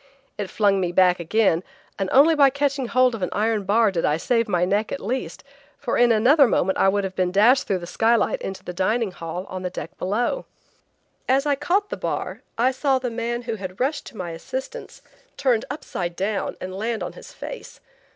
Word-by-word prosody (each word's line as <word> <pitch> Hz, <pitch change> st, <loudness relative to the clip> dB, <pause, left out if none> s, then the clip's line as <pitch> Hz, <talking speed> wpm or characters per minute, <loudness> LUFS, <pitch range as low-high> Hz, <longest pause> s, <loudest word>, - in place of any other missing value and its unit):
It 205 Hz, -2 st, -4 dB
flung 200 Hz, -2 st, +2 dB
me 175 Hz, -1 st, -1 dB
back 180 Hz, 0 st, +4 dB
again, 175 Hz, 0 st, +2 dB, 0.4 s
and 195 Hz, -1 st, -1 dB
only 290 Hz, +5 st, +6 dB
by 285 Hz, -3 st, +6 dB
catching 280 Hz, -1 st, -1 dB
hold 255 Hz, +1 st, +3 dB
of 225 Hz, -, -5 dB
an 180 Hz, -, -1 dB
iron 215 Hz, -1 st, 0 dB
bar 215 Hz, +2 st, +3 dB
did 170 Hz, -3 st, -2 dB
I 150 Hz, -, +2 dB
save 230 Hz, +6 st, +1 dB
my 180 Hz, -3 st, +1 dB
neck 205 Hz, +4 st, 0 dB
at -, -, -3 dB
least, 250 Hz, +6 st, -4 dB, 0.3 s
for 250 Hz, -, -2 dB
in 240 Hz, -1 st, +4 dB
another 260 Hz, +6 st, +5 dB
moment 190 Hz, -3 st, +1 dB
I 195 Hz, -, +5 dB
would 200 Hz, +1 st, 0 dB
have 190 Hz, -1 st, -4 dB
been 180 Hz, -1 st, 0 dB
dashed 225 Hz, +8 st, +4 dB
through 195 Hz, -, +1 dB
the 175 Hz, -, -7 dB
skylight 225 Hz, +6 st, +1 dB
into 190 Hz, -1 st, -6 dB
the 180 Hz, -, -6 dB
dining 210 Hz, +4 st, 0 dB
hall 175 Hz, +1 st, -6 dB
on 185 Hz, -, -6 dB
the 180 Hz, -, -3 dB
deck -, -, -7 dB
below. 235 Hz, -, -1 dB, 0.8 s
As 270 Hz, +2 st, +3 dB
I 290 Hz, -, +3 dB
caught 355 Hz, +9 st, 0 dB
the -, -, -3 dB
bar, -, -, -4 dB, 0.2 s
I 245 Hz, +3 st, +3 dB
saw 265 Hz, +1 st, +1 dB
the 250 Hz, -2 st, -3 dB
man 235 Hz, +1 st, -3 dB
who 230 Hz, -2 st, -4 dB
had 185 Hz, -1 st, -7 dB
rushed 285 Hz, +3 st, -1 dB
to 225 Hz, -, -12 dB
my 175 Hz, -2 st, -4 dB
assistance 260 Hz, -, -7 dB, 0.3 s
turned 250 Hz, -5 st, +1 dB
upside 180 Hz, -, -4 dB
down 195 Hz, +2 st, -2 dB
and 185 Hz, 0 st, -6 dB
land 220 Hz, +3 st, -2 dB
on -, -, -5 dB
his -, -, -12 dB
face. -, -, -9 dB
220 Hz, 210 wpm, -23 LUFS, 185-255 Hz, 0.8 s, only